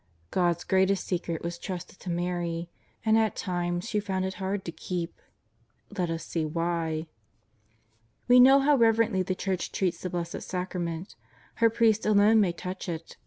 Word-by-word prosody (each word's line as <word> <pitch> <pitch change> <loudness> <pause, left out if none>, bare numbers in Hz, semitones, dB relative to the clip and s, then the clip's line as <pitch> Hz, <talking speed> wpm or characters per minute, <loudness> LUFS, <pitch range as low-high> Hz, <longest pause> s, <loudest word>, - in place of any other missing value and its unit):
God's 175 -2 +1
greatest 190 0 +2
secret 170 -3 -3
was 170 0 -4
trusted 185 0 -7
to 185 - -7
Mary, 175 -1 -2 0.3
and 220 0 +5
at 220 -2 +1
times 175 +1 -2
she 210 -3 0
found 190 -2 -2
it 190 - -3
hard 190 +1 -2
to 170 - -4
keep. 170 0 -5 0.7
Let 180 -3 -1
us 165 0 -3
see 165 - -2
why. 165 0 -1 1.2
We 250 0 +7
know 270 +2 +8
how 290 +1 +4
reverently 225 -4 +3
the 185 0 -1
Church 190 -1 -2
treats 180 -3 -1
the 185 - -3
Blessed 170 -1 -4
Sacrament. 180 -1 -4 0.4
Her 230 -1 +5
priests 220 -1 +2
alone 215 +1 +5
may 190 -4 +2
touch 180 +2 -6
it. 165 -1 -6
180 Hz, 165 wpm, -28 LUFS, 170-205 Hz, 1.2 s, know